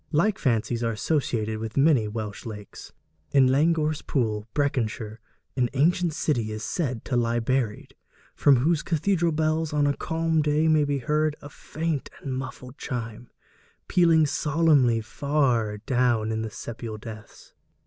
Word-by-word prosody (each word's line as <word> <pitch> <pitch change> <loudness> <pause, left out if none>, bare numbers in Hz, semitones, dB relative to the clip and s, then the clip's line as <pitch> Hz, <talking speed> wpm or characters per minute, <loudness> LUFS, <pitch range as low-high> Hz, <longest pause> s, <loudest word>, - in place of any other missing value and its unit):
Like 195 +7 +2
fancies 120 -1 0
are 115 -1 0
associated 110 -3 -1
with 110 +2 -6
many 135 -6 +4
Welsh 105 -1 -5
lakes. 105 -3 -9 0.4
In 135 -2 +6
Langorse 155 +1 +2
Pool, 110 -5 -1
Breconshire, 115 -6 -1 0.4
an 125 -2 +1
ancient 170 +4 +2
city 125 -8 -1
is 110 +1 -5
said 130 -1 -2
to 130 - -2
lie 120 -1 +1
buried, 120 -2 -2 0.4
from 140 - +5
whose 155 +6 +2
cathedral 170 +1 +1
bells 155 0 0
on 145 -1 +2
a 140 0 +1
calm 165 0 0
day 150 +1 +2
may 155 -2 +4
be 145 -1 0
heard 150 +3 0
a 145 - -10
faint 155 -1 -4
and 135 - -5
muffled 130 0 -7
chime, 120 -2 -5 0.6
pealing 165 -3 +4
solemnly 145 -5 +2
far 120 -4 0
down 120 -1 +1
in 110 0 -2
the 110 - -3
sepial 110 0 -7
depths. 110 -1 -11
135 Hz, 150 wpm, -25 LUFS, 115-155 Hz, 0.6 s, In